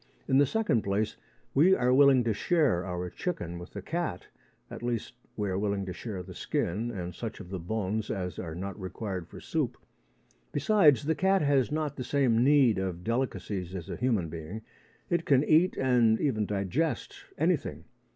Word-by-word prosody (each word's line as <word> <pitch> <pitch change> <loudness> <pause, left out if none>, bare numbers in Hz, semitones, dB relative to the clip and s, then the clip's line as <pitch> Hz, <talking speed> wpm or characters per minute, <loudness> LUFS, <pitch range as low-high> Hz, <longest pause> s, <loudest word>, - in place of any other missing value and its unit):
In 135 - +4
the 145 - +5
second 170 - +1
place, 100 +2 -1 0.4
we 175 +7 +6
are 125 -4 +2
willing 135 -2 +6
to 115 -2 +1
share 145 - +2
our 90 0 -3
chicken 90 - -4
with 90 - -11
the - - -6
cat 165 - -3 0.4
at - - -7
least, 120 -2 -3 0.2
we 105 -1 -1
are 95 0 -1
willing 100 -1 -1
to 90 - -5
share 95 -1 -6
the - - -10
skin 105 +8 -2
and 90 -6 -5
such 115 +4 -6
of 90 - -10
the 95 - -3
bones 105 +3 -2
as 90 -5 -3
are 80 -3 -5
not 100 +4 -5
required 95 -2 -5
for - - -11
soup. - - -2 0.7
Besides, 150 - +4
a 160 - +3
cat 190 0 +2
has 135 -5 +2
not 155 -1 -2
the 130 - -3
same 125 -3 +2
need 135 -6 +5
of 90 -2 -3
delicacies 105 -6 -2
as 85 -3 -6
a - - -3
human 110 -8 0
being. 85 +7 -7 0.5
It 170 -1 +2
can 140 -3 +4
eat, 160 +4 +4
and 120 -4 +3
even 110 -8 0
digest, 105 - -1 0.2
anything. - - 0
115 Hz, 180 wpm, -29 LUFS, 95-140 Hz, 0.7 s, we